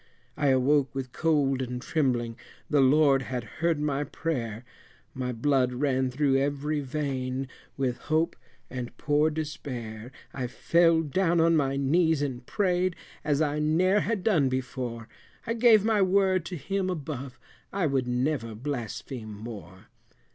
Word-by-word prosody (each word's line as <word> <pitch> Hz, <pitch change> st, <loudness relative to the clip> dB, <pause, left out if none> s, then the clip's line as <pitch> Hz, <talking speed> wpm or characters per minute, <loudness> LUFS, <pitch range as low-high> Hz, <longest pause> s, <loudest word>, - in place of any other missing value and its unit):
I 145 Hz, -, 0 dB
awoke 135 Hz, 0 st, +3 dB
with 130 Hz, -2 st, -4 dB
cold 140 Hz, -4 st, +1 dB
and 125 Hz, -1 st, -3 dB
trembling, 125 Hz, -5 st, 0 dB, 0.3 s
the 145 Hz, -2 st, +3 dB
Lord 135 Hz, 0 st, +5 dB
had 125 Hz, -2 st, -4 dB, 0.2 s
heard 165 Hz, -2 st, +2 dB
my 145 Hz, -1 st, 0 dB
prayer, 125 Hz, -7 st, -4 dB, 0.5 s
My 125 Hz, -1 st, -3 dB
blood 125 Hz, +1 st, +1 dB
ran 130 Hz, 0 st, +1 dB
through 135 Hz, +1 st, +2 dB
every 145 Hz, +2 st, 0 dB
vein, 135 Hz, -2 st, -3 dB, 0.3 s
with 130 Hz, -3 st, -1 dB
hope 160 Hz, +2 st, 0 dB, 0.3 s
and 125 Hz, -2 st, -6 dB
poor 150 Hz, +1 st, +2 dB
despair, 130 Hz, -7 st, -5 dB, 0.2 s
I 130 Hz, -2 st, -3 dB
fell 165 Hz, +5 st, +3 dB
down 170 Hz, +3 st, +1 dB
on 165 Hz, 0 st, +4 dB
my 135 Hz, -3 st, +1 dB
knees 155 Hz, +2 st, +2 dB
and 130 Hz, -3 st, -4 dB
prayed, 185 Hz, -, 0 dB, 0.3 s
as 150 Hz, 0 st, +2 dB
I 150 Hz, 0 st, -1 dB
ne'er 175 Hz, +6 st, +3 dB
had 210 Hz, -3 st, -1 dB
done 165 Hz, -11 st, +3 dB
before, 125 Hz, -2 st, -4 dB, 0.4 s
I 230 Hz, -, -1 dB
gave 225 Hz, -3 st, +5 dB
my 220 Hz, -2 st, +3 dB
word 190 Hz, -2 st, +3 dB
to 180 Hz, -, -5 dB
Him 185 Hz, +5 st, -2 dB
above, 140 Hz, -6 st, -5 dB, 0.3 s
I 195 Hz, -3 st, 0 dB
would 135 Hz, -4 st, 0 dB
never 125 Hz, -2 st, -1 dB
blaspheme 120 Hz, -2 st, -5 dB
more. 105 Hz, -3 st, -9 dB
140 Hz, 145 wpm, -27 LUFS, 125-160 Hz, 0.5 s, Lord